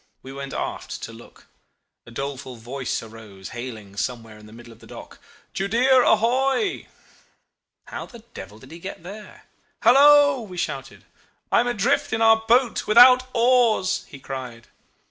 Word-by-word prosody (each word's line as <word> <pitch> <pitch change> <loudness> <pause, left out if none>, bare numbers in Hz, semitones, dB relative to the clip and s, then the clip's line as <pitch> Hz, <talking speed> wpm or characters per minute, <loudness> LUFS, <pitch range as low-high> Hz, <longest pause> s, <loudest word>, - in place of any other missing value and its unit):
We 135 - -10
went 140 0 -7
aft - - -6
to 115 - -7
look. 115 +1 -16 0.6
A - - -11
doleful 135 +1 -6
voice 125 +3 -5
arose 110 -4 -12
hailing 115 -5 -9
somewhere 115 -2 -5
in 105 - -15
the - - -15
middle 120 +1 -14
of - - -21
the - - -16
dock, - - -12 0.3
'Judea 245 +7 +2
ahoy!'... 265 - +1 1.0
How - - -8
the 235 -3 -15
devil 105 - -10
did 130 +5 -16
he 165 - -10
get 185 -1 -9
there?... 205 +4 -11 0.4
'Hallo!' 285 +2 +6
we 190 -5 -10
shouted. - - -6 0.5
'I - - +4
am 245 - +1
adrift 240 +1 0
in 225 - -1
our 225 0 +6
boat 240 +1 +2
without 250 +3 +7
oars,' 235 -5 +2
he 140 - -12
cried. 130 -4 -8
185 Hz, 155 wpm, -22 LUFS, -, 1.0 s, without